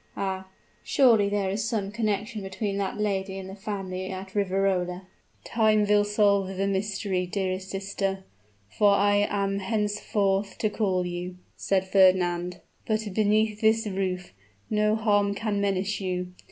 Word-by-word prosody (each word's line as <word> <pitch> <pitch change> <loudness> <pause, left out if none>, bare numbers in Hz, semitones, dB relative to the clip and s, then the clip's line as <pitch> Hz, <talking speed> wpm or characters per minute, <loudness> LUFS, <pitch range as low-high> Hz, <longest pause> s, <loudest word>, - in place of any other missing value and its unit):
Ah! 190 -1 -3 0.3
surely 230 -7 +4
there 200 -2 0
is 205 +2 -1
some 200 -3 -2
connection 210 0 -2
between 195 +1 -3
that 195 -1 -2
lady 195 -2 -1
and 190 -1 -7
the 190 - -8
family 195 -2 -5
at 190 0 -7
Riverola?" 190 -2 0 0.4
"Time 215 -2 +2
will 205 0 +4
solve 205 -2 +2
the 195 - +1
mystery, 195 -1 -1
dearest 190 0 -2
sister, 195 0 -3 0.4
for 200 - +3
so - - +1
I 205 0 +3
am 200 -1 -1
henceforth 205 -1 -1
to 215 - 0
call 190 -5 0
you," 180 +1 -5 0.2
said 190 -1 0
Fernand. 180 -2 +3 0.3
"But 215 -2 -1
beneath 215 +1 +2
this 220 0 +3
roof, 185 -3 -3 0.4
no 210 0 +2
harm 205 -2 +2
can 205 -2 -1
menace 200 0 -1
you. 180 -1 -3
200 Hz, 145 wpm, -26 LUFS, 190-210 Hz, 0.4 s, surely